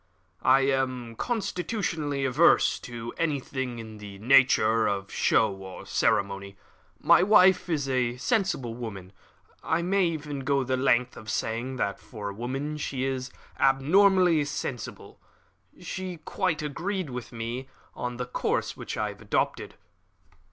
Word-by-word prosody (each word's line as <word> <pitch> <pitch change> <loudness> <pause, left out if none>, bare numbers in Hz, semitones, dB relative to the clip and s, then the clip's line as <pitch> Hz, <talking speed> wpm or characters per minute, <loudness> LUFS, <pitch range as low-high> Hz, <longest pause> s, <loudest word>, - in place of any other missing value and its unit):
"I 135 - +5
am 130 -3 -1
constitutionally 175 - -2
averse 135 +6 +4
to 120 -1 -7
anything 135 -5 -2
in 110 -2 -9
the 100 -1 -9
nature 115 -2 +4
of 100 -1 -2
show 110 -3 +2
or 95 -1 -9
ceremony. 100 0 0 0.4
My - - +5
wife 190 -2 +5
is 145 -5 0
a 125 -2 0
sensible 190 - 0
woman 100 -6 -7 0.5
I 165 +1 0
may 190 0 +2
even 150 -3 -4
go 135 0 +1
the 130 0 0
length 125 -1 +2
of 110 - -9
saying 115 +5 -2
that, 100 -5 -2
for 105 -4 -7
a - - -6
woman, 135 +7 -4
she 135 -3 -3
is 130 -1 -2 0.3
abnormally 170 +4 +4
sensible. 140 -5 -6 0.6
She 185 -2 -5
quite 160 0 -2
agreed 175 +2 -3
with 125 -1 -6
me 120 +3 -5 0.3
in 125 0 -4
the 125 - -3
course 125 - -1
which - - -6
I - - 0
have - - -11
adopted." - - -1
130 Hz, 135 wpm, -27 LUFS, 115-155 Hz, 0.6 s, I